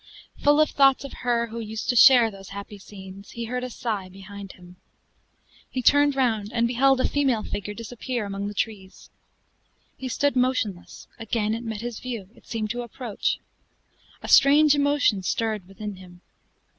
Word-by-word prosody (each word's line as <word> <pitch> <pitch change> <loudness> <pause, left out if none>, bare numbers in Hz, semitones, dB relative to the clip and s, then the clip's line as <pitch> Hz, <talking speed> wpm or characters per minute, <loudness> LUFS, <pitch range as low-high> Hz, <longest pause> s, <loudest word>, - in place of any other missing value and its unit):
Full 290 +1 +5
of 310 - +3
thoughts 275 -1 +4
of 275 - -8
her 240 -2 0
who 230 +1 -6
used 220 0 -5
to 245 - +2
share 240 -1 +7
those 195 -1 -12
happy 200 +1 -8
scenes, 195 0 -12
he 235 0 -6
heard 250 +2 -3
a 255 - -4
sigh 215 -6 -4
behind 195 +1 -10
him. 180 0 -16 0.9
He 255 - -3
turned 285 +2 +5
round, 225 -6 0
and 235 0 +1
beheld 265 +2 +3
a - - +2
female 265 -7 +1
figure 205 +1 -5
disappear 235 +1 -4
among 200 0 -4
the 205 - -6
trees. 195 -3 -5 0.8
He 265 - -6
stood 285 +3 0
motionless; 250 -8 -1
again 220 -1 -1
it 230 - -3
met 220 -2 -5
his 240 -2 -5
view; 230 -7 -6
it - - -22
seemed 215 -2 -3
to 245 +1 -3
approach. 235 -2 -3 0.9
A - - -5
strange 290 +2 +6
emotion 285 -8 +2
stirred 215 0 -2
within 205 0 -7
him. 180 -1 -14
225 Hz, 170 wpm, -25 LUFS, 200-255 Hz, 0.9 s, share